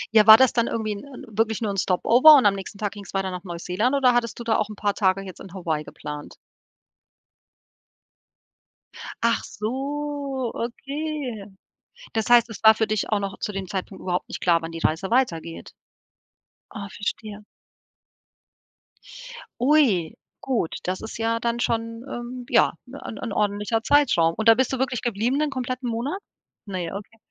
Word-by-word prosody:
Ja, 215 0 +6
war 220 0 +12
das 260 0 +4
dann 235 -1 +1
irgendwie 220 -2 -2
'n 200 - -8
'n 280 0 -11
wirklich 220 0 0
nur 215 -3 -1
'n 195 - -5
Stop-over 240 - +6
und 260 - +4
am 200 - +5
nächsten 195 +1 -7
Tag 205 -1 -2
ging's 200 -1 -10
weiter 190 -1 -1
nach 180 -1 -6
Neuseeland 185 +8 -1
oder 255 -3 +4
hattest 240 -1 -1
du - - -5
da 225 -1 +1
auch 215 0 -1
'n 210 - -8
paar 205 0 0
Tage 195 -1 +1
jetzt 190 -2 -10
in 190 - -11
Hawaii 160 -4 -2
geplant? 150 -1 -8 2.9
Ach 235 - +2
so, 275 +2 -3
okay. 275 -2 -4 0.7
Das 220 +1 -1
heißt, 240 -1 +6
es 220 - -9
war 220 0 +9
für 220 0 0
dich 215 -1 -1
auch 210 - +1
noch 195 -1 -4
zu 210 - -3
dem 195 -2 -5
Zeitpunkt 190 -1 -5
überhaupt 180 -1 -2
nicht - - -5
klar, 170 -2 +3
wann 165 0 -6
die 165 - -6
Reise 165 +6 -1
weitergeht. 170 -10 -1 1.0
Oh, 200 -2 -5
verstehe. 210 +1 -5 2.2
Ui, 245 - +3 0.3
gut, 240 -11 -1
das 185 +1 -3
ist 220 - -7
ja 230 0 0
dann 235 0 -1
schon, 230 0 -2
ähm, 245 0 -6
ja, - - +4
’ne 265 +3 -10 0.2
’n 230 - -4
ordentlicher 210 +2 0
Zeitraum. 235 - +3
Und 220 - -2
da 225 - +8
bist 260 0 0
du 260 - -2
wirklich 255 -3 -1
geblieben 240 +4 0
den 305 -1 +1
kompletten 255 -1 -3
Monat? 245 +11 -3 0.5
Ne, 180 -4 -4
okay. 210 +2 -9
220 Hz, 170 wpm, -24 LUFS, 195-250 Hz, 2.9 s, war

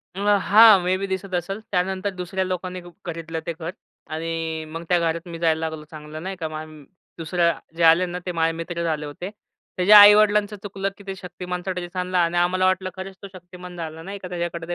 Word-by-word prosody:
अ, - - -6 0.3
हां, 215 -1 +8
may 180 +1 +1
be 195 - -3
दिसत 190 0 -4
असल. 180 +4 -3
त्यानंतर 190 +1 0
दुसऱ्या 185 +1 -2
लोकांनी 185 0 -4
हुक 175 0 -14
खरीदलं 165 -1 -5
ते 170 - -2
घर 165 +1 -4 0.4
आणि 160 0 -3
मग 165 +1 -5
त्या 175 -1 +4
घरात 170 +1 -1
मी 165 -1 -7
जायला 160 -1 +2
लागलो 160 -1 -4
चांगलं 155 0 -9
नाही 190 +1 -4
का. 160 - -2
मम 155 -1 -8 0.3
दुसऱ्या 170 +1 +1 0.3
जे 170 - +1
आले 165 +3 +6
ना 180 0 -5
ते 180 - -2
माझे 165 -1 +1
मित्रच 170 0 -4
आले 155 -2 -2
होते. 150 +6 -7 0.5
त्याच्या 195 +4 +8
आई-वडिलांचं 210 0 +6
चुकलं 195 -1 -3
की 200 - -14
ते 195 - -4
शक्तिमानचा 180 0 -5
ड्रेस 180 0 -6
आणला 180 0 0
आणि 170 +1 0
आम्हाला 180 +2 +2
वाटलं 185 0 +1
खरंच 190 +1 -7
तो 200 - -8
शक्तिमान 180 0 -11
झाला, 160 -1 -6
नाही 195 +3 -6
का, 185 - -7
त्याच्याकडे 170 -1 -4
180 Hz, 210 wpm, -23 LUFS, 165-190 Hz, 0.5 s, हां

